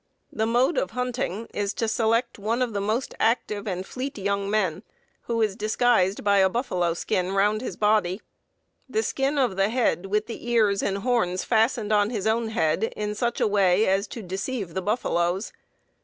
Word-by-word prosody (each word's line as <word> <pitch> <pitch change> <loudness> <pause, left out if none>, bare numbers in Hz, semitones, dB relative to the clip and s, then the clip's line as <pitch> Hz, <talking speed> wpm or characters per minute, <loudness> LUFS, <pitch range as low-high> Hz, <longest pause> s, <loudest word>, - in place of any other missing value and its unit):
The 220 0 0
mode 250 - +2
of - - -2
hunting 245 -4 -2
is 205 -1 -2
to 225 - -1
select 230 +1 0
one 230 +5 0
of 240 -3 -3
the 200 - -1
most 220 +6 -1
active 220 -2 0
and 185 -1 -3
fleet 265 +4 -5
young 200 0 -1
men, 190 -5 0 0.4
who 230 -1 0
is 210 -3 0
disguised 215 -2 +1
by 200 -1 +4
a 190 0 +5
buffalo 180 -7 -1
skin 180 +2 -1
round 205 +2 +2
his 255 - -5
body; 210 -3 +2 0.7
the 440 - 0
skin 275 -3 -1
of 245 -8 +1
the 195 +1 +2
head 225 -6 0
with 210 +2 0
the 235 +1 -7
ears 215 -4 +3
and 195 0 -1
horns 200 -5 0
fastened 225 -1 +1
on 205 0 +3
his 215 -4 -3
own 225 +1 +1
head 185 -2 +1
in 210 0 -3
such 235 +2 -1
a - - +3
way 200 0 +3
as 195 +2 +1
to 225 +2 -8
deceive 195 +1 -4
the 190 - -2
buffaloes. 185 -3 -1
210 Hz, 185 wpm, -25 LUFS, 195-235 Hz, 0.7 s, a